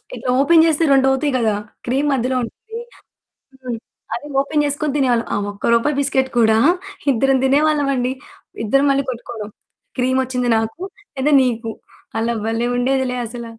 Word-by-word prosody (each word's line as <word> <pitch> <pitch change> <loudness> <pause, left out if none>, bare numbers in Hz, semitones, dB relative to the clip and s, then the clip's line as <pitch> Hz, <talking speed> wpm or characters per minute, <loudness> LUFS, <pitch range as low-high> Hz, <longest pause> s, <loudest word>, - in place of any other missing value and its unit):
ఇట్లా 250 +1 -3
ఓపెన్ 325 +3 +5
చేస్తే 325 0 +2
2 270 -1 +4
అవుతాయి 265 +1 0
కదా! 220 -3 +1 0.3
క్రీమ్ 270 +4 +1
మధ్యలో 260 0 0
ఉంటుంది. 445 - -9 0.8
హ్మ్. 240 -2 -3 0.4
అది 290 +5 -7
ఓపెన్ 295 +1 0
చేసుకొని 290 0 -1
తినేవాళ్ళం. 245 -4 +2
ఆ - - 0
ఒక్క 205 +3 -1
రూపాయి 275 +5 +1
బిస్కిట్ 265 -1 +1
కూడా 220 -1 +4 0.6
ఇద్దరం 270 +3 +2
తినేవాళ్ళం 290 +1 +2
అండి. 250 +1 -1 0.5
ఇద్దరు 275 +6 +3
మళ్ళి 275 0 +1
కొట్టుకోవడం. 230 -3 -7 0.5
క్రీమోచ్చింది 255 -1 0
నాకు 225 +9 -3 0.4
లేదా 285 +3 +2
నీకు. 230 -2 -2 0.5
అలా 230 +1 0
భలే 225 +2 0
ఉండేదిలే 260 0 0
అసల. 235 +1 -7
260 Hz, 145 wpm, -19 LUFS, 235-280 Hz, 0.8 s, ఓపెన్